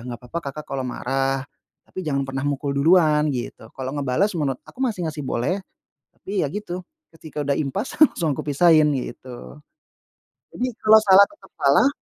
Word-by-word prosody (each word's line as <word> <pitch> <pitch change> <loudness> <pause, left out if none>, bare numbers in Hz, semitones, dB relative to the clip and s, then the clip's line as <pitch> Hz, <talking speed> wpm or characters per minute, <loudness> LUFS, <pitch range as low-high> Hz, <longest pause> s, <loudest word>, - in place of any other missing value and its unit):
"Enggak 120 -1 -7
apa-apa 165 +7 -4
Kakak 150 +2 -9
kalo 135 -1 -2
marah, 135 +2 -1 0.4
tapi - - -7
jangan 140 -2 0
pernah 135 0 -4
mukul 140 0 -2
duluan," 155 -1 +4
gitu. 120 -2 -6
Kalau 130 -1 -4
ngebales 145 +9 +1
menurut 135 -3 -1
aku - - -17
masih 225 -9 -1
ngasih 150 -1 -7
boleh, 130 +13 -1 0.6
tapi 195 0 -3
ya 140 - -5
gitu, 185 -3 -5 0.3
ketika 155 -1 -8
udah 140 - +2
impas 155 - -3
langsung 160 - +1
kupisahin 155 +1 +4
gitu. 125 +2 -9 1.0
Jadi 250 - -2 0.2
kalau 220 0 +8
salah 195 0 +7
tetap 310 - -19
salah 145 - +4
150 Hz, 160 wpm, -22 LUFS, 135-185 Hz, 1.0 s, kalau